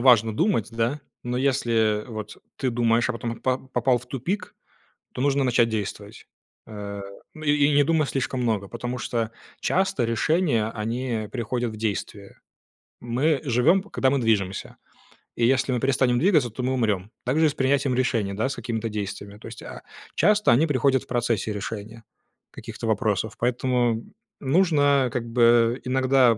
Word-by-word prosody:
важно 115 -4 +5
думать, 165 - +1
да? 115 +6 -1 0.2
Но 125 0 -3
если 115 -5 +1
вот 110 -2 -7 0.2
ты 130 -2 -1
думаешь, 115 0 +2
а 125 - 0
потом 115 0 -4
по 130 -1 +1
попал 125 0 +2
в 120 - -14
тупик, 180 - -4 0.6
то - - -4
нужно 140 0 +2
начать 120 -2 +3
действовать. 105 0 -5 0.4
Э, 100 -1 -7 0.3
ну 155 - -9
и 145 - +3 0.2
и - - +2
не 145 - +5
думай 155 0 +2
слишком 130 -1 -2
много. 110 -5 0
Потому 120 +3 -5
что 115 -2 -2 0.3
часто 190 -9 +1
решения 115 0 +1
они, 115 +1 -2
э, 105 - -11
приходят 120 -1 -2
в 110 - -9
действие. 105 -2 -4 0.6
Мы 135 +6 +1
живем, 140 +9 +3
когда 135 -9 0
мы 140 - +2
движемся. 100 -5 -1 0.6
И 115 - +2
если 130 +1 +2
мы 120 - -1
перестанем 130 -2 +2
двигаться, 155 -6 +3
то 125 +4 -6
мы 130 +1 0
умрем. 105 -4 0
Так 130 +5 +1
же 160 - +5
и - - +3
с - - -4
принятием 135 -1 +1
решений, 115 -6 0
да, 110 +6 0
с 130 - -4
какими-то 115 -1 -3
действиями. 100 -1 -5
То - - -11
есть, - - -10
а, - - -9 0.3
часто 210 - +4
они 140 +7 +4
приходят 135 -3 +2
в - - -21
процессе 120 -3 0
решения 110 +2 -6 0.5
каких-то 115 - -7
вопросов. 110 0 0
Поэтому 120 -1 +1 0.4
нужно 145 -3 +3
как 120 -2 -2
бы 120 0 +4
иногда, 130 -2 +3
120 Hz, 170 wpm, -24 LUFS, 110-135 Hz, 0.6 s, важно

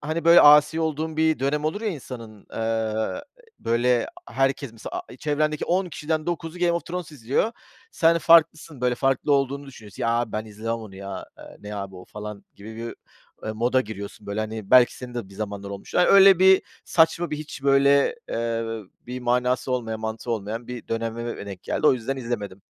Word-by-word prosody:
hani, 160 +2 -3
böyle, 170 +1 +8
asi 150 +2 +7
olduğun 160 0 -2
bir 160 0 +2
dönem 145 +3 0
olur 180 +7 -1
ya 225 - -1
insanın, 115 - -8
eee, - - -8 0.9
e 460 - -25
böyle, 120 +1 +2 0.2
a - - -12
herkes 135 -1 0
mesela, 115 - -7
a - - -10
i - - -11
çevrendeki 150 0 0
10 185 +2 +1
kişiden 155 -1 -3
9'u 170 0 -4
Game 175 -1 +2
of 170 - -2
Thrones 175 -2 -5
izliyor. 140 - -1 0.4
Sen 170 - +3
farklısın, 155 -3 +4
böyle, 125 0 +2
farklı 135 +3 +1
olduğunu 140 0 0
düşünüyorsun. 110 -7 -10
"Ya, 115 - +1
abi 120 -1 0
ben 110 +1 -2
izlemem 110 +2 -5
onu 110 -4 -8
ya, 100 0 -7
eee, - - -12
ne 105 0 -7
abi 100 -1 -6
o?" 90 - -11
falan 105 -1 -8
gibi 110 +2 -10
bir, 115 +1 -5
ü - - -6 0.5
eee, 110 - -2
moda 120 +4 +2
giriyorsun, 105 -2 -8
böyle, 100 +2 -2
hani 110 -2 -5
belki 125 -1 +6
senin 125 -1 -9
de 120 -5 -5
bir 100 - -15
zamanlar 100 -1 -5
olmuş. 100 0 -9
Ay, 180 - +5
öyle 195 -2 +8
bir 190 0 +6 0.2
saçma, 170 0 +2
bir 150 - -2
hiç, 150 -2 -8
böyle, 140 - +4
eee, 115 0 -2 0.4
bir 125 +1 -5
manası 125 +1 0
olmayan, 115 -3 -2
mantığı 110 +2 -4
olmayan 115 +2 -3
bir 125 -1 -8
dönemime 115 -1 -4
denk 95 -3 -8
geldi. 155 - -1
O - - +7
yüzden 130 +2 -3
izlemedim. 105 -6 -5
125 Hz, 200 wpm, -24 LUFS, 110-155 Hz, 0.9 s, böyle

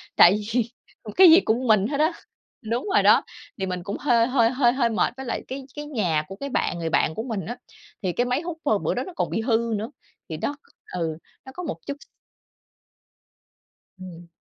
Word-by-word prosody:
Tại 175 - +8 0.2
vì 235 -1 +1 0.5
cái 370 -2 +9
gì 335 - +9
cũng 245 -1 0
mình 215 -2 +4
hết 285 -1 -2
á. 315 +3 +3 0.5
Đúng 235 - -2
rồi - - +4
đó, - - +6 0.4
thì 190 - -1
mình 180 -1 -4
cũng 200 +2 -4
hơi 235 -5 +3
hơi 245 -3 +3
hơi 250 -2 +3
hơi 250 -3 +1
mệt, 215 -5 0
với 265 - -6
lại - - -3
cái 265 +1 -6
cái 295 0 -6
nhà 185 - 0
của 195 - -8
cái 280 +8 -6
bạn 180 -8 -1
người 165 -1 -2
bạn 160 - +1
của 220 - -3
mình 220 -8 -4
á, 240 +2 -5 0.5
thì 185 - 0
cái 245 - +1
máy 250 +4 0
hút, 340 -1 -5
à, - - +3
bữa - - 0
đó - - -2
nó 370 - -9
còn - - -1
bị 225 - -1
hư 230 -1 +1
nữa. 220 +5 -5 0.4
Thì 160 - -4
đó 285 - -2 0.4
ừ, 165 -3 -2 0.4
có 360 - -7
một 320 - -4
chút 285 0 -4
x - - -13 2.0
Ừm. 175 -2 -10
230 Hz, 215 wpm, -24 LUFS, 190-270 Hz, 2.0 s, cái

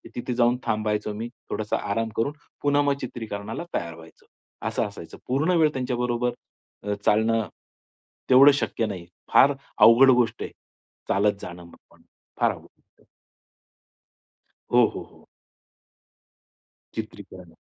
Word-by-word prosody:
तिथे 125 +1 -3
जाऊन 120 0 +3
थांबायचो 105 0 -1
मी. 110 +3 -5 0.2
थोडासा 110 -1 -2
आराम 115 +2 -1
करून, 130 +6 0 0.3
पुन्हा 145 0 +3
मग 145 -1 +2
चित्रीकरणाला 110 0 -5
तयार 85 -1 -3
व्हायचं, 80 0 -16 0.4
असं - - -1
असायचं. - - -11
पूर्ण 155 +8 +1
वेळ 155 -2 +4
त्यांच्याबरोबर 125 -1 -1 0.5
अ, 105 0 -1
चालणं 110 +1 +2 0.8
तेवढं 135 +3 +8
शक्य 120 -4 -1
नाही. 95 -5 -6 0.3
फार 140 +2 +7 0.2
अवघड 120 +4 +7
गोष्ट 120 -2 +1
आहे, - - -6 0.6
चालत 100 +1 +2
जाणं 90 0 -8
म 85 - -15 0.2
पण. - - -22 0.4
फार - - +3
अवघड. - - -16 1.7
हो, - - +7
हो, - - -5
हो. - - -21 1.7
चित्रीकरण 95 -5 -8
115 Hz, 120 wpm, -25 LUFS, 105-125 Hz, 1.7 s, तेवढं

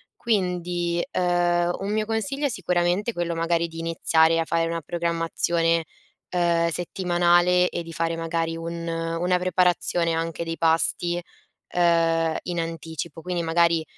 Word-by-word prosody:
Quindi, 180 -5 -1
uhm, 175 -1 +2
un 195 +1 -3
mio 215 0 0
consiglio 275 +7 -1
sicuramente 180 0 0
è - - -19
quello, 175 -2 -2
magari, 165 0 0
di 165 0 -9
iniziare 165 0 +2
a 165 - 0
fare 165 0 0
una 165 0 -3
programmazione, 165 0 0 0.5
uhm, 170 -1 +2
settimanale 175 +1 +2
e 175 - -4
di 165 - -10
fare, 165 0 -1
magari, 165 0 -2
un 170 0 -5
una 165 +2 0
preparazione 180 -2 +1
anche 165 +1 -2
dei 165 0 -4
pasti, 165 +1 +1 0.5
uhm, 165 -2 +2
in 175 -1 -3
anticipo; 165 -1 -6
quindi, 180 0 -2
magari, 165 0 +2
170 Hz, 135 wpm, -24 LUFS, 165-175 Hz, 0.5 s, uhm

